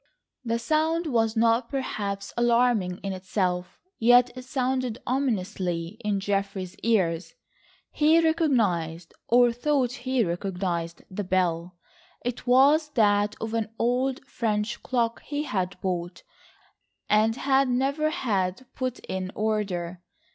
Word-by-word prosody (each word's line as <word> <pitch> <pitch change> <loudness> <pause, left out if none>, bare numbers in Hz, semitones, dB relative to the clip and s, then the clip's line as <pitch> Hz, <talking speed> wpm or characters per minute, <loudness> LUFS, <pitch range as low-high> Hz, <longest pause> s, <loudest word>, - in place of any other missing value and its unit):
The 230 -1 0
sound 315 +7 +1
was 225 -5 +1
not 230 +1 +3
perhaps 200 -8 -3
alarming 235 -6 +2
in 195 -1 -2
itself, 185 -1 -2 0.2
yet 245 +2 +6
it 255 0 -8
sounded 255 -3 -1
ominously 195 -8 -2
in 205 -2 0
Geoffrey's 195 -2 -2
ears. 185 - 0 0.6
He 310 +2 +4
recognised, 215 - +1
or 245 0 +5
thought 255 +1 +1
he 255 -1 0
recognised, 175 -2 -3
the 205 +2 -3
bell. 180 -2 0 0.5
It 245 0 -4
was 285 +5 +5
that 205 -2 +3
of 225 0 -4
an 225 -1 -1
old 250 +3 0
French 215 -2 -2
clock 235 -2 -1
he 295 0 -3
had 185 -8 -2
bought, 175 -1 -3 0.8
and 215 +2 +3
had 270 0 +2
never 275 +5 +1
had 215 - -1
put 255 -1 -3
in 185 0 -4
order. 195 -5 -2
225 Hz, 120 wpm, -26 LUFS, 185-255 Hz, 0.8 s, yet